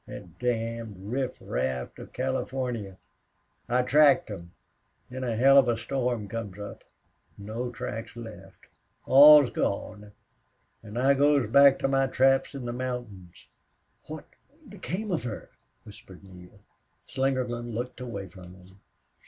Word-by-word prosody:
That 85 -3 -11
damned 115 -3 -3
riffraff 65 - -3
out - - -18
of - - -11
Californy. 125 -5 -3 0.7
I 125 +1 +2
tracked 140 -3 +4
'em. 85 -4 -9 0.6
Then 130 +1 -5
a 120 -3 -2
hell 135 +4 +6
of 130 - +3
a 120 -1 +1
storm 120 -4 -2
comes 100 -3 -6
up. 100 0 -9 0.5
No 110 +5 -5
tracks 115 -1 -7
left! 95 -5 -11 0.4
All's 145 -3 +8
lost! 105 +1 -3 0.8
An' 110 +1 -9
I 135 +3 +4
goes 140 -3 +3
back 140 +1 +7
to - - -1
my 135 0 +2
traps 135 +1 +2
in 135 -3 -6
the 120 - -4
mountains." 120 -8 -7 0.6
"What 155 0 -8 0.4
became 205 0 -5
of 165 -9 -1
her?" 115 -4 -7 0.3
whispered 95 -2 -14
Neale. 95 +1 -15 0.5
Slingerland 125 -3 -2
looked 125 +2 -5
away 100 -6 -6
from 90 0 -13
him. 95 +1 -19
120 Hz, 135 wpm, -27 LUFS, 105-135 Hz, 0.8 s, All's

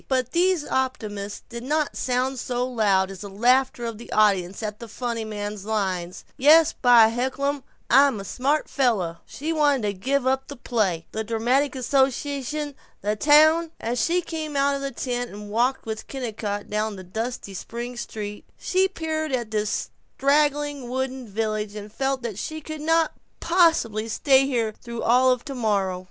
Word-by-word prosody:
But 255 -2 0
these 355 -1 +2
optimisms 210 -6 -3
did 235 -1 -7
not 300 +4 -1
sound 255 +1 -1
so 245 0 -1
loud 200 -6 +2
as 190 -1 -9
the 200 - -7
laughter 245 +4 +2
of 230 -2 -5
the 235 - -11
audience 200 -2 +2
at 210 -1 -4
the 235 - -8
funny 235 0 -3
man's 205 -2 -5
line, 190 -5 -1 0.3
"Yes, 310 +4 +6
by 240 -3 +6
heckelum, 265 +4 -1 0.3
I'm 270 -3 +5
a 195 - -7
smart 280 +8 0
fella." 210 - 0
She 315 +4 -3
wanted 290 -5 +2
to 205 -1 0
give 255 +7 -1
up 265 +1 +1
the 285 - -8
play, 205 -10 -1
the 220 - -3
dramatic 245 +6 +1
association, 275 +3 0 0.3
the 210 +1 0
town. 315 +6 +5
As 230 0 -1
she 350 +1 +1
came 315 -3 -5
out 280 0 +3
of 275 - -3
the 275 - -2
tent 245 -1 -3
and 205 0 -9
walked 245 +4 +1
with 220 -1 -5
Kennicott 215 -6 -4
down 215 0 -1
the 190 - -9
dusty 220 +2 -5
spring 235 +6 -6
street, 210 -3 -6
she 375 +1 +2
peered 315 -4 -3
at 240 -4 -2
this 210 -1 -1 0.3
straggling 290 -2 +1
wooden 260 -1 -3
village 215 0 -2
and 210 0 -8
felt 270 0 -1
that 220 -4 -4
she 315 +6 -4
could 310 0 -7
not 325 +1 +2 0.3
possibly 325 - +2
stay 270 +4 +3
here 235 -5 0
through 235 -1 -6
all 250 +2 +5
of 250 +1 -1
tomorrow. 210 -9 -1
245 Hz, 170 wpm, -24 LUFS, 215-280 Hz, 0.3 s, Yes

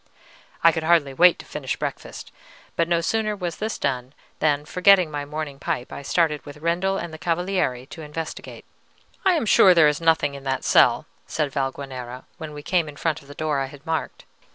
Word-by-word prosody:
I 165 - +8
could 160 - -3
hardly 160 -4 +3
wait 175 +5 +6
to - - -11
finish - - -4
breakfast; - - -6 0.4
but 170 - +1
no 170 -1 +2
sooner 215 +4 0
was 175 -4 -4
this 220 +1 -3
done 130 -1 -2 0.3
than, 150 -1 +1
forgetting 180 -1 +4
my 145 -1 -4
morning 150 -1 -6
pipe, 125 - -3
I - - -6
started 150 +1 0
with 145 0 -10
Rendel 175 +5 0
and 170 - -5
the 160 - -8
Cavaliere 170 -7 -1
to 160 - -10
investigate. 155 +1 -7 0.6
"I 380 -2 +4
am 320 -9 0
sure 190 -3 +6
there 160 -3 +7
is 150 +2 0
nothing 160 -3 +2
in 140 -1 -9
that 135 -1 -2
cell," - - +4 0.2
said 150 -3 -1
Valguanera, 130 -2 -4
when 160 -2 -6
we 145 0 -9
came 170 -3 +1
in 145 - -11
front 160 +1 -2
of 140 - -19
the 145 - -11
door 155 -3 -1
I 135 - -1
had 145 +2 -14
marked. 160 -1 -3
155 Hz, 200 wpm, -23 LUFS, 140-170 Hz, 0.6 s, I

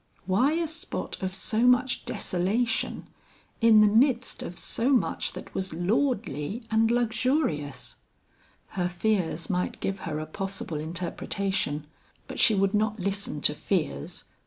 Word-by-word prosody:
Why 235 +11 +3
a 335 0 0
spot 320 +2 -4
of 190 0 -1
so 220 +5 +1
much 250 +1 +3
desolation 210 +4 -1 0.5
in 225 -2 +7
the - - +7
midst 240 +3 +2
of 175 - -6
so 240 +4 0
much 255 - +1
that - - -9
was 190 -4 -3
lordly 195 - -1
and 225 +1 +3
luxurious? 235 - 0 0.7
Her 180 -2 -1
fears 175 -3 0
might 180 -1 -1
give 195 0 -2
her 155 -4 -4
a 155 - -3
possible 190 -1 -4
interpretation, 170 -1 -2 0.4
but - - -7
she 220 -5 +5
would 195 +1 +2
not 215 +1 +1
listen 195 -5 -2
to 150 - +6
fears. 150 - -2
200 Hz, 135 wpm, -27 LUFS, 175-230 Hz, 0.7 s, in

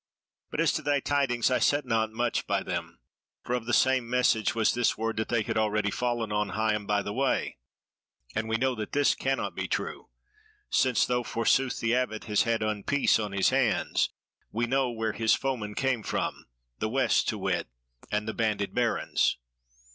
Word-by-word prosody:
But - - -5
as - - +4
to - - -1
thy 145 -1 +1
tidings, 135 -4 +1
I 125 - +2
set 145 -1 +2
not 110 -2 0
much 120 +2 -1
by - - 0
them; - - -4 0.5
for 125 - -3
of 120 -2 -2
the - - -1
same 130 -1 +3
message 125 -3 +2
was 115 -2 +2
this 120 -1 +1
word 115 0 -2
that 110 - -2
they 115 -2 +1
had 110 - -1
already 105 -1 +1
fallen 120 -2 -1
on 105 -1 0
Higham 105 -2 0
by 105 -1 +1
the 100 - -4
Way; 130 - 0 0.7
and 110 +1 -2
we 115 - +1
know 130 +2 +1
that 110 -3 -6
this 145 0 +3
cannot 135 0 -2
be - - -3
true; - - -4 0.6
since 130 -2 +3
though 125 0 0
forsooth 125 +2 +1
the 115 0 +1
Abbot 125 -4 -1
has 105 -2 +1
had 115 -1 +1
unpeace 110 +3 +1
on 105 - -5
his 100 -1 +3
hands, 130 -5 +1 0.4
we 115 +2 0
know 135 +1 +1
where 110 -2 -2
his 110 -1 +3
foemen 115 -6 -3
came 130 -4 0
from, - - -3 0.3
the 110 - -1
West 135 +3 +2
to - - -2
wit, - - -1 0.4
and 105 +1 -1
the 110 - -2
Banded 105 -3 -1
Barons." 120 -1 +1
115 Hz, 190 wpm, -28 LUFS, 110-125 Hz, 0.7 s, as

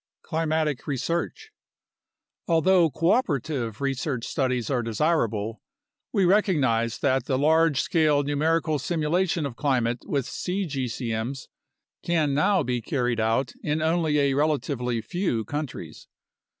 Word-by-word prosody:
Climatic 155 -4 -1
Research 165 - -3 1.0
Although 170 +1 +4
cooperative 140 - 0
research 135 -2 -2
studies 130 -4 -1
are 125 -3 +1
desirable, 115 - 0 0.5
we 195 - +2
recognize 135 - +2
that 135 -1 +1
the 130 - 0
large 160 0 +3
scale 150 -3 +2
numerical 155 +2 +1
simulation 165 +2 0
of 135 -4 -5
climate 120 -3 0
with 140 -4 -1
cgcm's 130 - -3 0.5
can 160 -5 +1
now 185 +5 +3
be 125 -2 -1
carried 120 -1 -1
out 115 +3 0
in 150 +1 -1
only 160 -1 +1
a 140 -1 +2
relatively 135 -5 0
few 120 - -2
countries. 135 - -6
145 Hz, 110 wpm, -25 LUFS, 125-160 Hz, 1.0 s, Although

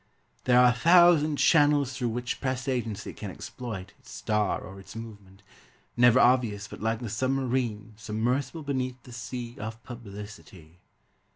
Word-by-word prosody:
There 125 0 +5
are 125 0 +7
a - - -3
thousand 170 +1 +5
channels 145 -3 +4
Through 125 -2 -2
which 120 +1 -4
press 130 0 -2
agency 115 -5 -3
can 105 - -7
exploit 100 -1 -7
Its - - -18
star 105 -2 -1
or 95 +1 -10
its 95 - -13
movement 105 -3 -10 0.5
Never 120 +1 +6
obvious 115 -6 +3
but - - -11
like 110 +1 -1
the 120 - -4
submarine 120 -2 -1
Submersible 120 +7 -2
beneath 130 -3 -3
the 125 - -13
sea 120 0 -6
Of 110 +1 -7
publicity. 100 -7 -11
120 Hz, 150 wpm, -27 LUFS, 105-130 Hz, 0.5 s, are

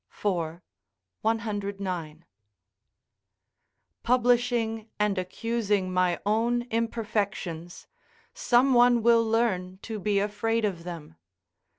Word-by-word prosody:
4, 170 -4 -3 0.6
109.] 200 -7 -3 1.8
publishing 240 -2 +1
and 210 -2 +1
accusing 205 -1 -1
my 180 -1 +2
own 230 +3 +1
imperfections, 210 -7 -3 0.5
some 255 +2 +3
one 240 -1 +5
will 230 0 +5
learn 215 -5 0
to 220 -2 -5
be 205 +1 0
afraid 210 +3 0
of 175 -5 -3
them. 165 - -8
210 Hz, 85 wpm, -27 LUFS, 185-230 Hz, 1.8 s, one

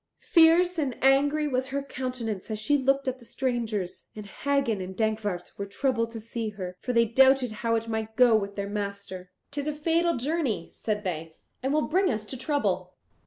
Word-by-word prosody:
Fierce 340 +1 +6
and 270 -5 -1
angry 285 +3 +4
was 260 -2 -1
her 275 +1 -2
countenance 250 -7 -4
as 215 - -2
she 215 +7 +1
looked 275 0 +1
at 260 0 -2
the - - -15
strangers, 230 -7 -3
and 210 -1 -7
Hagen 265 -1 0
and 185 0 -7
Dankwart 215 -5 -1
were 200 - -3
troubled 230 +2 0
to 230 -1 -7
see 225 0 -4
her, 185 -3 -6
for 250 - -2
they 235 -1 +4
doubted 265 +1 +4
how 230 +2 -1
it 225 0 -2
might 220 -1 -3
go 245 -2 +6
with 200 -2 -1
their 200 0 -3
master. 200 -3 -5 0.2
"'Tis 285 0 -3
a 300 - 0
fatal 330 +2 +1
journey," 255 - -1
said 210 -1 -2
they, 165 -3 -4 0.3
"and 265 +1 -1
will 305 +1 +2
bring 370 +4 +2
us 215 -3 -2
to 260 - -5
trouble." 285 +3 -1
235 Hz, 195 wpm, -27 LUFS, 210-275 Hz, 0.3 s, Fierce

